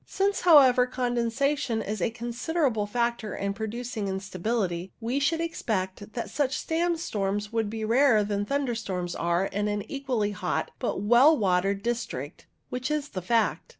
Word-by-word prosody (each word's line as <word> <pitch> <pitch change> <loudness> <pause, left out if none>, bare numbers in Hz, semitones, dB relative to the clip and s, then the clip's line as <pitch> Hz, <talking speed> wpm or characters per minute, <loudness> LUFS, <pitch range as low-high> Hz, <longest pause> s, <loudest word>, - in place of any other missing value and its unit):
Since, 395 +1 0
however, 265 -7 +7
condensation 245 +1 0
is 210 -1 -4
a - - +2
considerable 240 0 -1
factor 235 -1 -1
in 200 0 -2
producing 220 0 -4
instability, 190 -1 -2
we 240 +4 -1
should 320 +3 +1
expect 210 - -3
that 235 - -3
such 280 -3 0
sandstorms 225 - -1
would 225 -2 0
be 220 0 -4
rarer 235 -1 +4
than 205 0 -1
thunder 275 +2 -1
storms 185 -6 -3
are 170 +2 0
in 205 +2 -2
an 205 -1 -1
equally 255 -7 -1
hot 205 - -2
but - - -2
well 245 +9 +6
watered 195 0 +1
dis 240 0 0
trict, 140 +5 -7 0.2
which 250 +2 -3
is 300 -1 -1
the 185 - -5
fact. 225 +4 0
230 Hz, 155 wpm, -27 LUFS, 200-260 Hz, 0.2 s, however